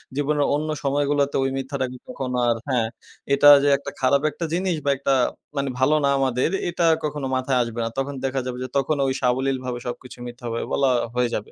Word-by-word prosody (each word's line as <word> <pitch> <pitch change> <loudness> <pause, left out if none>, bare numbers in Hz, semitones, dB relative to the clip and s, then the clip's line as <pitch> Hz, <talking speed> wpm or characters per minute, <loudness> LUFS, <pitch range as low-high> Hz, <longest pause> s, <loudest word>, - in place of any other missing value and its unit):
জীবনের 145 0 +1
অন্য 155 +1 -2
সময়গুলাতে 140 0 +1
ওই 135 - +1
মিথ্যাটাকে 130 -1 -3
তখন 130 -2 -5 0.2
আর 120 -1 +3
হ্যাঁ, 120 -4 +1 0.5
এটা 145 +1 +7
যে 145 - +4
একটা 140 0 -7
খারাপ 135 +2 +3
একটা 165 +4 -4
জিনিস, 180 0 0
বা - - +2
একটা 140 0 +1 0.4
মানি 140 0 0
ভালো 145 +4 +4
না - - +3
আমাদের 130 -2 +1 0.2
এটা 170 0 0 0.2
কখনো 145 -2 -2
মাথায় 130 0 0
আসবে 115 0 -6
না। 115 - -1
তখন 135 +1 -2
দেখা 135 0 -1
যাবে 125 -1 -4
যে, 130 - -4
তখনও 140 +1 +1
ওই - - 0
সাবলীলভাবে 130 0 0
সবকিছু 125 +1 -7
মিথ্যা 120 +1 -10 0.3
বলা 135 -2 +3 0.2
হয়ে 125 -1 +2
যাবে। 105 - -5
135 Hz, 195 wpm, -23 LUFS, 125-145 Hz, 0.5 s, এটা